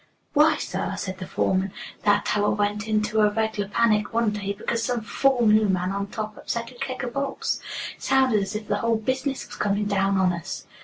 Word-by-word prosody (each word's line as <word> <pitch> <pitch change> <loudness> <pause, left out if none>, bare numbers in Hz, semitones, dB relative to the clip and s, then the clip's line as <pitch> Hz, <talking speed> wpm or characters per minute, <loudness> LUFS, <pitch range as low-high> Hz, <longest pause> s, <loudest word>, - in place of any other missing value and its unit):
"Why, 300 +1 +5
sir," - - -3
said 185 -1 -4
the 185 - -6
foreman, 190 +1 0 0.3
"that 205 - +4
tower 205 0 +2
went 205 +1 0
into 215 0 +1
a 210 - +5
reg'lar 220 -1 -1
panic 210 0 +2
one 230 -1 +2
day 200 -1 -3
because 230 +3 -2
some 240 0 -1
fool 250 +2 +2
new 215 -1 +5
man 185 0 +1
on 200 0 -2
top 215 +1 -5
upset 235 0 -4
a - - -14
keg 260 +1 -4
o' - - -3
bolts. 275 +1 -2 0.4
Sounded 260 -6 +3
as 195 +2 -4
if 215 0 -4
the 205 - +1
whole 230 +1 +1
business 260 +4 -2
was - - -10
coming 205 0 0
down 195 -1 +1
on 185 -1 +3
us." 170 -2 -6
210 Hz, 205 wpm, -25 LUFS, 200-235 Hz, 0.4 s, Why